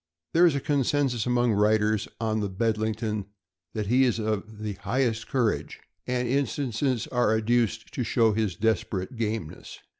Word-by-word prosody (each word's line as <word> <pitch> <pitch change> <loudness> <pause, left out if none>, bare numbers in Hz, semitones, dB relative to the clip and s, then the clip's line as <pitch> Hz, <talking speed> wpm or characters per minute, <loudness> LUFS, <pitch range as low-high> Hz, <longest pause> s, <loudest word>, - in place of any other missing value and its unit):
There 175 +2 +6
is 155 - +2
a - - +1
consensus 140 -4 0
among 120 -1 +2
writers 105 0 +2
on 110 -1 0
the 100 -1 -1
Bedlington 110 0 -1 0.5
that 105 -1 -1
he 125 +6 +4
is 125 -4 +2
of 110 -1 -3
the 105 -1 -4
highest 115 +3 -1
courage, 120 -5 -1 0.3
and 125 -1 0
instances 130 -2 0
are 120 -3 +1
adduced 115 0 0
to 125 - -1
show 115 -2 +3
his 105 -4 -1
desperate 110 -1 -1
gameness. 110 -7 -4
110 Hz, 150 wpm, -26 LUFS, 110-125 Hz, 0.5 s, There